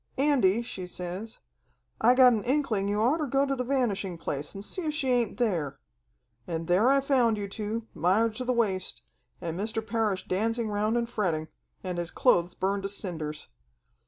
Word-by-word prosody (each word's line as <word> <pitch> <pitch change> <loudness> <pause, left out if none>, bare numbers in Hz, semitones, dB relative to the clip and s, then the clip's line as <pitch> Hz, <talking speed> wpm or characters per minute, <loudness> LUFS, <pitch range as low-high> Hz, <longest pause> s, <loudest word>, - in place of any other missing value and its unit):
'Andy,' 250 -7 +3
she 185 -6 -6
says. 180 +5 -5 0.6
'I 245 +3 +6
got 255 -1 +7
an 215 -3 -1
inkling 240 -7 +1
you 205 +1 0
oughter 285 +7 +2
go 275 +2 +2
to 275 -1 -1
the 250 - -2
Vanishing 225 -9 -1
Place 145 -1 -4
and 195 +1 -5
see 370 - -2
if 310 -3 -2
she 270 -4 0
ain't 240 -3 +1
there.' 175 - 0 0.7
And 165 -1 -3
there 190 +8 +4
I 275 0 +5
found 250 -5 +2
you 200 -1 -3
two, 215 +3 -4
mired 205 +8 +2
to 255 - -3
the 255 - 0
waist, 205 -6 -1 0.4
and 170 0 -4
Mr. 220 +1 -2
Parrish 220 -4 -1
dancing 225 +4 0
around 210 +3 +1
and 235 -1 0
fretting, 170 -9 -1 0.3
and 180 -2 -3
his 170 -1 -3
clothes 175 0 +2
burned 195 +1 0
to 195 - -3
cinders. 160 -7 -4
215 Hz, 185 wpm, -28 LUFS, 185-245 Hz, 0.7 s, got